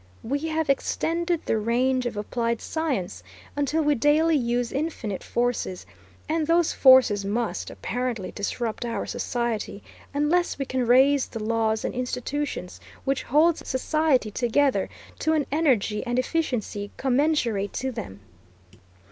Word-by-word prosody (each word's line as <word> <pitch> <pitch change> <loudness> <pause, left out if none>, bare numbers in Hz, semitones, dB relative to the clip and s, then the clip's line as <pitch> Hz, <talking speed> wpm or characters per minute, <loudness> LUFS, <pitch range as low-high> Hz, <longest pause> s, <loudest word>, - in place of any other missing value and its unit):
We 280 +5 -1
have 320 0 -1
extended 335 +4 0
the 220 - +1
range 250 +3 +1
of 235 -3 -5
applied 230 +2 -1
science 255 - -3 0.3
until 290 +3 +1
we 295 0 +3
daily 300 +5 +3
use 240 -2 0
infinite 270 - -3
forces, 240 -6 -2 0.4
and 315 -1 0
those 335 0 +3
forces 260 -6 +6
must, 220 +4 -2
apparently, 245 -6 -3
disrupt 220 +3 -3
our 230 -4 -3
society, 235 -4 -3 0.3
unless 300 +5 +1
we 275 - -2
can 255 -2 -1
raise 265 +3 +5
the 225 -2 -6
laws 220 0 0
and - - -2
institutions 250 -4 -3 0.3
which 275 0 0
hold 315 +5 +3
society 265 -3 +1
together 260 +5 +1 0.3
to 315 - +1
an 305 -3 +1
energy 255 -9 +1
and 245 -1 -2
efficiency 250 -8 -1
commensurate 255 -7 +1
to 265 +1 -2
them. 100 - -7
255 Hz, 130 wpm, -25 LUFS, 225-295 Hz, 0.4 s, forces